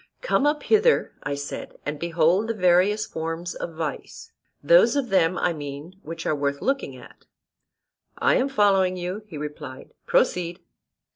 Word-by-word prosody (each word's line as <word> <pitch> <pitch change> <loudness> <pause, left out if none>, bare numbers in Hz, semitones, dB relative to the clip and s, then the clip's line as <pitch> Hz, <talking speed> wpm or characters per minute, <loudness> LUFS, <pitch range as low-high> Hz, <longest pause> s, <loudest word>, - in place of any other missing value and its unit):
Come 290 - +2
up 295 0 0
hither, 445 +2 +3
I 145 - -3
said, 140 0 -7
and 145 0 -4
behold 170 +5 +2
the 230 - -2
various 185 +3 +3
forms 165 +2 -4
of 165 - -6
vice, 160 -1 -6 0.3
those - - +5
of 275 -4 -1
them, 185 -2 +2
I 175 - +1
mean, 150 +4 -8
which 165 +1 -7
are - - +1
worth 140 -1 -1
looking 270 +1 -1
at. - - -16 0.9
I - - +3
am 265 +2 +1
following 195 -6 +3
you, 180 +4 -4
he 165 -7 -8
replied: 145 -2 -8
proceed. 180 - +1
175 Hz, 155 wpm, -24 LUFS, 160-215 Hz, 0.9 s, those